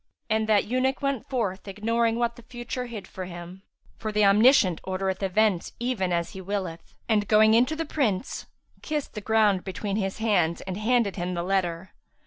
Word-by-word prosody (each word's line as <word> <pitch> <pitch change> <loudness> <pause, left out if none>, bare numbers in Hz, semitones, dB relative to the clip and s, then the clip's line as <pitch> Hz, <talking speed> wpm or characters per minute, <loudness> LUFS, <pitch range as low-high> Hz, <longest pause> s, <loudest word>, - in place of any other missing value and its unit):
And 220 0 +1
that 210 -2 +4
eunuch 260 +3 0
went 275 -4 -1
forth 205 -7 -2
ignoring 225 +3 0
what 235 0 0
the - - -13
future 240 +1 -6
hid 225 -4 -7
for 185 - -7
him 175 +1 -9 0.4
(for 215 - -3
the 210 -1 +3
Omniscient 200 - +5
ordereth 190 0 -2
events 195 -1 +1
even 235 -7 -1
as 170 -1 -1
He 190 - -8
willeth); 185 -3 -5
and, 210 -3 +2
going 220 +1 +5
in 240 +2 +5
to 315 - -3
the 325 +1 -3
Prince, 260 -8 -1 0.3
kissed 300 -2 -3
the 210 - -5
ground 210 -3 +3
between 200 +1 -3
his 195 -2 -2
hands 190 -7 +1
and 190 -1 -5
handed 220 0 +1
to - - -8
him 180 +1 -2
the 170 - -2
letter. 185 -1 -1
210 Hz, 190 wpm, -26 LUFS, 190-235 Hz, 0.4 s, Omniscient